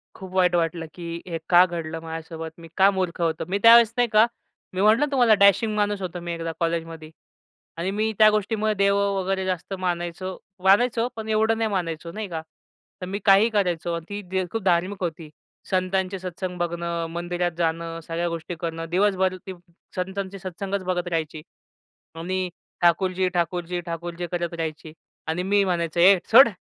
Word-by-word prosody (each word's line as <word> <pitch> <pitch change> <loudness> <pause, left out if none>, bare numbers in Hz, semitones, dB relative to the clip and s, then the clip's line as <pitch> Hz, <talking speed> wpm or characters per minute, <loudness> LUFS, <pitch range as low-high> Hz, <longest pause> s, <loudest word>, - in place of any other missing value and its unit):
खूप 190 -1 -10
वाईट 180 -1 +3
वाटलं, 165 0 0
की 170 -1 -6
हे 170 -2 -3
का 175 0 +7
घडलं 165 -2 -5
माझ्यासोबत? 160 0 -7
मी 165 - -11
का 195 +1 +6
मूर्ख 185 -2 -2
होतो? 160 -1 0
मी 190 +2 0
त्यावेळेस, 230 -1 +8
नाही 245 0 +3
का, 215 +1 +7 0.5
मी 185 - -1
म्हटलं 220 +8 +5
तुम्हाला, 245 -5 +5
डॅशिंग 200 +2 +4
माणूस 205 -1 0
होतो 180 -1 -4
मी 170 0 -4
एकदा 165 0 -4
कॉलेजमध्ये 165 -1 -3 0.7
आणि 180 +3 -2
मी 215 +2 0
त्या 215 - +8
गोष्टीमुळे 215 +1 0
देव 200 0 +2 0.2
वगैरे 190 0 -1
जास्त 185 +1 -3
मानायचो. 180 +1 -3 0.3
मानायचो, 230 +4 +4
पण 220 -1 -6
एवढं 220 +1 +2
नाही 225 -1 0
मानायचो, 170 -3 -3
नाही 215 +2 -5
का. 160 -2 -4 0.6
तर - - -3
मी 200 +2 -3
काहीही 200 +3 +6
करायचो 175 -5 0
आणि 190 +5 -6
ती 190 0 +1
खूप 225 -2 -3
धार्मिक 185 +2 +1
होती. 165 -2 -4 0.4
संतांचे 190 0 0
सत्संग 180 0 -5
बघणं, 170 -1 -2
मंदिरात 175 +1 -2
जाणं, 165 0 -1
सगळ्या 170 +2 -2
गोष्टी 170 +1 -5
करणं, 165 -1 -4
दिवसभर 190 0 +2
ती 190 - -4 0.4
संतांचे 190 +1 -4
सत्संगच 190 +1 -4
बघत 180 -1 -2
राहायची. 160 -2 -3 0.7
आणि 185 +2 -2 0.3
ठाकूरजी, 185 +2 +2
ठाकूरजी, 175 0 -2
ठाकूरजी 170 +1 -5
करत 175 -1 -2
राहायची 160 -1 -5 0.3
आणि 165 +3 -1
मी 200 +1 +3
म्हणायचो, 170 -2 -1
"ए 190 +3 +7
सोड, 240 +2 +9
180 Hz, 165 wpm, -24 LUFS, 170-200 Hz, 0.7 s, सोड